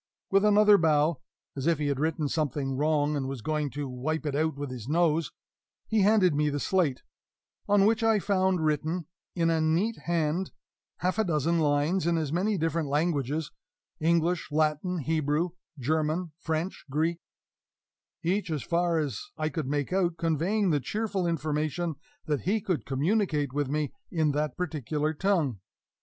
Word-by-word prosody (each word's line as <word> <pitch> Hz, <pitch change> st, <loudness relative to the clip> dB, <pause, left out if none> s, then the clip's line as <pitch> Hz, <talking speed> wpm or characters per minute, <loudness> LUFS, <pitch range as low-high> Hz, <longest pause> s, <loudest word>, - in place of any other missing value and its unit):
With 195 Hz, +1 st, +4 dB
another 210 Hz, 0 st, +6 dB
bow 155 Hz, -1 st, +2 dB, 0.3 s
(as 135 Hz, +2 st, -3 dB
if 170 Hz, -2 st, +3 dB
he 150 Hz, -, -2 dB
had 140 Hz, -2 st, 0 dB
written 155 Hz, 0 st, 0 dB
something 140 Hz, -3 st, -1 dB
wrong 150 Hz, +1 st, +1 dB
and 135 Hz, -2 st, -2 dB
was 135 Hz, -4 st, -5 dB
going 150 Hz, -2 st, -1 dB
to 145 Hz, -1 st, -3 dB
wipe 150 Hz, +5 st, -3 dB
it 145 Hz, -, -1 dB
out 155 Hz, +1 st, 0 dB
with 140 Hz, -2 st, -4 dB
his 120 Hz, -3 st, -7 dB
nose), 165 Hz, +1 st, +2 dB, 0.5 s
he 220 Hz, -1 st, +1 dB
handed 195 Hz, -4 st, +4 dB
me 150 Hz, +1 st, +2 dB
the 145 Hz, 0 st, -2 dB
slate, 165 Hz, -6 st, +1 dB, 0.7 s
on 200 Hz, -1 st, +5 dB
which 225 Hz, +2 st, +3 dB
I 225 Hz, -1 st, +4 dB
found 190 Hz, -4 st, +1 dB
written 155 Hz, +3 st, 0 dB, 0.3 s
in 165 Hz, -1 st, +2 dB
a 160 Hz, -1 st, +1 dB
neat 175 Hz, +9 st, +1 dB
hand 170 Hz, +2 st, 0 dB, 0.5 s
half 185 Hz, +4 st, 0 dB
a -, -, +4 dB
dozen 165 Hz, -1 st, +1 dB
lines 150 Hz, +4 st, +1 dB
in 170 Hz, -1 st, +2 dB
as 155 Hz, -2 st, -2 dB
many 200 Hz, +4 st, +1 dB
different 165 Hz, -2 st, -1 dB
languages 150 Hz, -1 st, 0 dB, 0.5 s
English, 170 Hz, +1 st, +1 dB
Latin, 155 Hz, +4 st, +1 dB
Hebrew, 155 Hz, +3 st, 0 dB, 0.3 s
German, 155 Hz, +5 st, -1 dB
French, 160 Hz, +3 st, -3 dB
Greek 160 Hz, +4 st, 0 dB, 1.0 s
each, 185 Hz, +2 st, 0 dB
as 155 Hz, -3 st, -2 dB
far 170 Hz, 0 st, +1 dB
as 140 Hz, -9 st, -2 dB, 0.2 s
I 155 Hz, 0 st, 0 dB
could 150 Hz, -2 st, -3 dB
make 145 Hz, +3 st, -1 dB
out, 175 Hz, -3 st, +1 dB
conveying 170 Hz, +5 st, +1 dB
the 145 Hz, -, +2 dB
cheerful 200 Hz, -, -2 dB
information 155 Hz, +1 st, -1 dB, 0.3 s
that 150 Hz, -4 st, -1 dB
he 205 Hz, +5 st, +1 dB
could 185 Hz, -5 st, -2 dB
communicate 150 Hz, -, 0 dB
with 145 Hz, -2 st, -1 dB
me 150 Hz, 0 st, -1 dB, 0.2 s
in 160 Hz, -5 st, +1 dB
that 150 Hz, +1 st, -2 dB
particular 155 Hz, -2 st, -2 dB
tongue. 160 Hz, -, 0 dB
160 Hz, 165 wpm, -28 LUFS, 145-175 Hz, 1.0 s, another